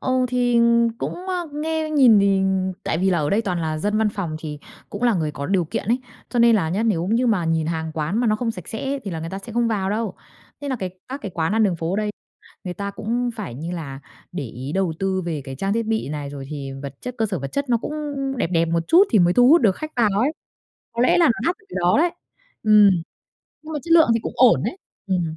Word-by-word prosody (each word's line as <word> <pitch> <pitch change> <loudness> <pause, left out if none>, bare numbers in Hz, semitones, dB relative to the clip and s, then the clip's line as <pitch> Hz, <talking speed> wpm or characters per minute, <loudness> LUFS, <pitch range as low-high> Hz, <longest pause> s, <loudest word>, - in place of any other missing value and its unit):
Ừ, 255 -1 +1
thì 245 -1 +2 0.4
cũng, - - -3
ơ, 355 -3 -2
nghe 315 +1 -2
nhìn 260 -8 +6
thì 200 -1 +3 0.4
tại - - -1
vì 190 +2 +2
là 175 - +2
ở 150 -1 0
đây 215 +3 +2
toàn 180 -5 -2
là 155 -1 -2
dân 210 +5 0
văn 220 -1 +3
phòng 185 -7 -4
thì 150 -2 -6 0.3
cũng - - -6
là 240 -3 +4
người 155 -4 -1
có 140 0 -5
điều 190 -3 +1
kiện - - -4
ấy, 240 - +3 0.3
cho 245 - -2
nên 235 -1 +6
là 170 -6 0
nhá, 190 +7 -1
nếu 190 -7 +1
như 230 +5 +2
mà 210 -7 +2
nhìn 165 -1 0
hàng 160 -1 -2
quán 160 +7 -1
mà 245 - +1
nó 215 -1 +2
không 235 0 -1
sạch 180 -7 -8
sẽ 270 +5 -3
thì 200 - -4
là 165 -2 -4
người 165 - -5
ta 195 - -4
sẽ 225 +4 -10
không 235 +1 +1
vào 195 -4 -1
đâu. 215 -2 -2 0.5
Thế 285 - -5
nà 260 - -1
cái 185 -5 -4 0.2
các 270 +2 -5
cái 200 - -4
quán 160 +2 0
ăn 225 +1 +3
đường 190 -5 +2
phố 165 +3 -2
đây, 210 0 -1 0.5
người 180 -1 -4
ta 200 +3 -4
cũng 235 +4 -2
phải 200 - -6
như 160 +7 -5
là 145 -6 -6 0.3
để 165 -6 -4
ý 130 +5 -7
đầu 190 -2 0
tư 190 -1 -1
về 160 -4 -2
cái 135 - -6
trang 195 +7 -1
thiết 230 +1 -1
bị 220 -6 -1
này 145 -1 -5
rồi 140 -1 -7
thì 140 -3 -5
vật 140 -1 -6
chất, 250 0 -6
cơ 225 - +2
sở 195 -4 -3
vật 140 - -5
chất 280 -1 -2
nó 240 - +3
cũng 245 - -5 0.4
đẹp 245 - 0
đẹp 165 -1 +3
một 165 0 +1
chút 360 +4 +7
thì 220 - +4
mới 175 -1 +4
thu 245 +3 +6
hút 330 +5 +7
được 205 -7 +3
khách 310 0 -6
vào 210 -4 +2
ấy, 275 +6 +2 0.6
có 235 +1 0
lẽ 255 - +4
là 340 - +5
nó 235 +1 +1
đắt 355 - 0
ở 435 - -27
cái - - -7
đó 175 +1 +3
đấy. 345 +3 +3 0.5
Ừm, 210 -2 +7 0.7
nhưng 315 +1 -8
mà 300 - -2
chất 335 - -1
lượng 330 -1 +7
thì 230 - +1
cũng - - -4
ổn - - +5
đấy. - - -2 0.3
Ừm. 175 -4 -1
200 Hz, 270 wpm, -22 LUFS, 165-240 Hz, 0.7 s, chút